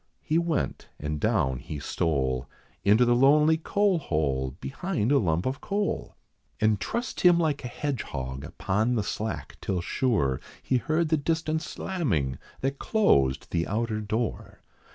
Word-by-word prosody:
He 160 +2 +2
went, 170 -4 -2
and 75 +1 -3
down 65 -3 +1
he 75 +4 -6
stole 70 -3 -1 0.3
Into 105 +5 +5
the 120 - +4
lonely 150 +5 +5
coal 195 +2 +2
hole, 70 - -1
behind 145 - -2
a 140 - +5
lump 85 -5 0
of 130 +1 -2
coal, 200 0 -2 0.4
And 110 -2 +3
trussed 235 - -3
him 175 -1 +6
like 155 -4 0
a - - -3
hedgehog 70 - -4
upon 105 +9 0
the 110 - +1
slack 110 +2 -4
till 95 -2 -1
sure, 85 - 0 0.2
He 130 - +2
heard 155 +5 0
the 160 - +3
distant 160 +1 0
slamming, 105 - -2 0.2
that 135 +1 -1
closed 70 - +2
the 85 0 0
outer 110 +1 -1
door. 110 +2 -3
115 Hz, 150 wpm, -27 LUFS, -, 0.4 s, him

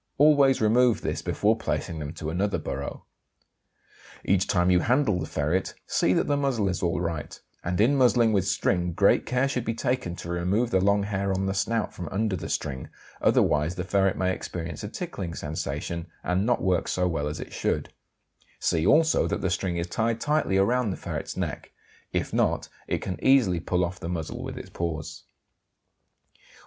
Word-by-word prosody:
Always 140 -3 +5
remove 120 +2 +4
this - - -2
before - - +1
placing 80 - -3
them 75 -1 -5
to 80 -1 -5
another 100 +4 0
burrow. - - -5 1.2
Each 95 -1 +2
time 90 -1 +2
you 90 - +5
handle 120 -2 +2
the 80 - -4
ferret 80 +6 -1
see 90 - +1
that - - +2
the 145 - +1
muzzle 135 -8 0
is 90 - -2
alright, 85 -3 -2 0.2
and 90 +2 -2
in 120 +7 +4
muzzling 120 -4 +4
with 95 -2 +1
string 90 -3 +1
great 100 +4 +3
care 125 +2 +2
should 125 -3 -2
be 115 -1 -2
taken 120 -8 -1
to 85 - -8
remove 90 +7 0
the 95 - +3
long 100 +1 +3
hair 100 -1 -1
on 95 0 0
the 95 - 0
snout 110 +3 -1
from 90 -3 -6
under 105 0 0
the 85 - -6
string; 65 -1 -3 0.3
otherwise 75 +3 +3
the 90 - -3
ferret 95 0 +1
may 95 0 +1
experience 85 -2 -6
a 105 - -4
tickling 100 - -5
sensation, 80 +2 -4 0.2
and 95 +4 0
not 125 - +1
work 90 -2 +1
so 90 0 +1
well 80 -4 -1
as 75 +1 -4
it - - -8
should; - - -2 0.7
see 80 - +1
also 160 +1 +4
that - - -2
the 95 - 0
string 95 -2 -1
is 85 - -1
tied 115 +5 -1
tightly 150 -8 +1
around 120 +4 +2
the 95 - -3
ferret's - - -5
neck; - - -4 0.4
if - - -2
not - - +1 0.2
it - - -2
can 90 - -5
easily 120 -10 +4
pull 90 +2 0
off 90 +2 -6
the 85 - -5
muzzle 85 -3 -4
with - - -6
its - - -9
paws. 80 -2 -4
95 Hz, 185 wpm, -26 LUFS, 85-115 Hz, 1.2 s, Always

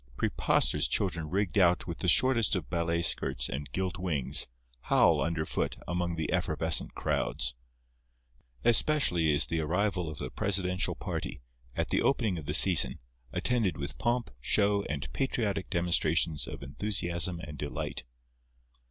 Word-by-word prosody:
Preposterous - - +2
children 85 -5 -1
rigged 100 +2 0
out 90 -1 +3
with 85 -2 -6
the 90 - -2
shortest 120 +2 +4
of 80 -7 -5
ballet 85 0 0
skirts - - +2
and 70 -2 -6
gilt 95 +2 -3
wings, 80 -8 +2 0.4
howl, - - +4
underfoot, 80 -1 -2
among 85 0 -2
the 80 -2 -3
effervescent - - 0
crowds. 60 0 -1 1.1
Especially 115 - +3
is 75 +1 +3
the 80 - -2
arrival 90 +2 -1
of 75 - -8
the - - -5
presidential 95 -2 0
party, - - -5 0.4
at - - -1
the - - +1
opening 110 -10 0
of 75 - -10
the 75 - 0
season, 90 -2 +5 0.3
attended 110 - 0
with 70 -1 -5
pomp, 120 0 -1
show 100 - +1
and 70 -2 -4
patriotic 105 -7 -2
demonstrations 85 -3 +1
of - - -8
enthusiasm 85 +2 -1
and 75 -3 -9
delight. 75 - -4
85 Hz, 140 wpm, -29 LUFS, 80-100 Hz, 1.1 s, season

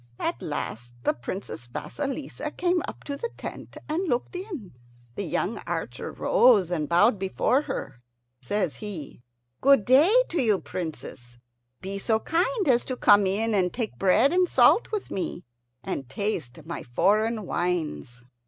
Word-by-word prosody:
At - - -2
last 120 +2 -5
the - - +2
Princess 120 -2 -6
Vasilissa 280 - -4
came 350 +2 0
up - - -8
to 285 - -4
the 470 +11 -4
tent - - -8
and 335 +5 -1
looked 245 +8 -1
in. 350 - -6 0.4
The - - -4
young - - -1
archer - - -4
rose 230 - +4
and 155 -4 -1
bowed 200 +5 +4
before 195 +8 +1
her. 135 - -6 0.4
Says 175 +5 -1
he, 190 - -7 0.4
"Good 275 -6 +5
day 280 +9 +6 0.2
to 335 -4 0
you, 215 -6 +3
Princess! 150 -8 -7 0.4
Be 195 +1 -5
so 220 +2 +1
kind 370 - 0
as 245 -3 +4
to 255 - -4
come 205 -3 +5
in 220 +4 0
and 185 -3 +2
take 235 -3 -4
bread 225 - +4
and 360 -1 +3
salt 285 - +5
with 425 -2 -3
me, 180 -3 -4 0.4
and 135 -3 -4
taste 160 - -3
my 170 - -5
foreign 210 - +1
wines." 160 -10 -2
210 Hz, 155 wpm, -26 LUFS, 175-280 Hz, 0.4 s, day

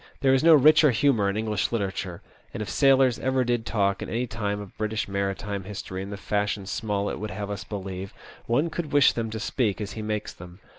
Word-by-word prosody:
There 135 -1 +4
is 135 - +3
no 165 -1 +8
richer 150 +1 +6
humour 115 -4 +2
in 100 - -2
English 110 -2 -1
literature, 95 -5 -3 0.3
and 110 - -2
if - - -7
sailors 135 -3 +4
ever 130 0 +1
did 120 -1 -1
talk 100 -1 0
in - - -5
any 120 +2 -1
time 105 -3 -3
of 100 -2 -10
British 110 0 -2
maritime 100 0 -3
history 95 -2 -6
in 95 - -6
the 100 - -6
fashion 105 0 -1
Smollett 100 0 -2
would 110 - -4
have 100 +1 -5
us 100 -2 -5
believe, 95 0 -6 0.4
one 145 +8 +1
would 165 -4 -3
wish 145 -2 +5
them 115 -1 -3
to 110 0 -5
speak 110 -2 -1
as 105 -1 -4
he 110 - -6
makes 105 0 -3
them. 90 +1 -12
105 Hz, 215 wpm, -26 LUFS, 100-120 Hz, 0.4 s, no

